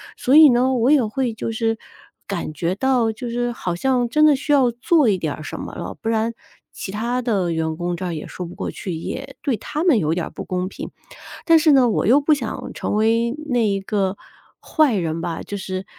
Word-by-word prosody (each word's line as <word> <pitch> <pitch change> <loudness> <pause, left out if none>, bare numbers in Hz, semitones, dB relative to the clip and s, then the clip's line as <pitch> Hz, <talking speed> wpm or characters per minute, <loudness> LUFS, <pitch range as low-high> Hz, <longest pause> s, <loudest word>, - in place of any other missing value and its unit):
所 260 - +2
以 310 -1 +9
呢， 250 +1 +3
我 245 0 +2
也 280 -6 +4
会 240 +2 -2
就 225 +1 -4
是 225 0 -1 0.5
感 175 -5 -4
觉 170 +3 -1
到， 245 0 +1
就 235 +3 -6
是 240 +1 -1
好 180 -7 -4
像 250 +5 +1
真 305 +6 +3
的 305 - +6
需 290 +2 -3
要 260 -4 +4
做 260 +3 +2
一 195 - +2
点 155 -5 -3
儿 155 - -9
什 - - -6
么 - - -7
了， - - -6
不 - - -5
然 225 +1 0 0.4
其 - - -7
他 235 +5 -2
的 200 -8 0
员 160 -1 -1
工 175 +1 -3
这 185 - -5
儿 175 - -3
也 155 - -6
说 180 - -6
不 170 - -10
过 - - -4
去， 185 - -6
也 265 +11 -6
对 260 -5 0
他 300 - -4
们 335 -9 +4
有 155 -3 0
一 - - -2
点 175 -2 -2
儿 - - -8
不 - - -8
公 185 0 -2
平。 - - -7 0.6
但 330 -1 +6
是 315 -1 +4
呢， 260 -4 +5
我 215 - 0
又 255 +7 +5
不 305 +2 +3
想 245 -6 -5
成 - - -3
为 230 +3 +2
那 240 -4 +2
一 200 -1 0
个 195 -1 -1 0.4
坏 310 -6 +2
人 165 -4 -2
吧 165 -1 -4
就 205 - -6
是， 190 -1 -5
225 Hz, 255 characters per minute, -21 LUFS, 185-260 Hz, 0.6 s, 以